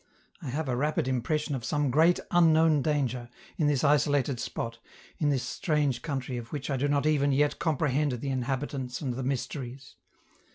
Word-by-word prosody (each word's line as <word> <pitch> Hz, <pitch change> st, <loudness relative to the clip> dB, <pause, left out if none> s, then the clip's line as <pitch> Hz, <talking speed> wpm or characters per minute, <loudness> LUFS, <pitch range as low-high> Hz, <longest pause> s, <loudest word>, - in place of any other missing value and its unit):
I 155 Hz, -, -7 dB
have 150 Hz, +4 st, -2 dB
a 125 Hz, -, 0 dB
rapid 145 Hz, +1 st, 0 dB
impression 145 Hz, +4 st, -1 dB
of 130 Hz, -4 st, -3 dB
some 145 Hz, 0 st, 0 dB
great 165 Hz, +5 st, +4 dB
unknown 160 Hz, -3 st, +5 dB
danger, 130 Hz, -5 st, -1 dB, 0.3 s
in 155 Hz, -, +2 dB
this 145 Hz, -3 st, +1 dB
isolated 145 Hz, -3 st, +2 dB
spot, 115 Hz, 0 st, -4 dB, 0.4 s
in 150 Hz, -, +2 dB
this 135 Hz, -3 st, +1 dB
strange 140 Hz, -1 st, 0 dB
country 135 Hz, -4 st, -3 dB
of 115 Hz, -1 st, -8 dB
which 145 Hz, -1 st, -4 dB
I 135 Hz, -, 0 dB
do 140 Hz, +3 st, +1 dB
not 145 Hz, 0 st, +1 dB
even 145 Hz, -2 st, +3 dB
yet 145 Hz, +2 st, +2 dB
comprehend 150 Hz, -3 st, +1 dB
the 125 Hz, +3 st, -4 dB
inhabitants 130 Hz, 0 st, -3 dB
and 130 Hz, -4 st, -2 dB
the 130 Hz, -, -4 dB
mysteries. 130 Hz, 0 st, -4 dB
140 Hz, 175 wpm, -28 LUFS, 130-150 Hz, 0.4 s, unknown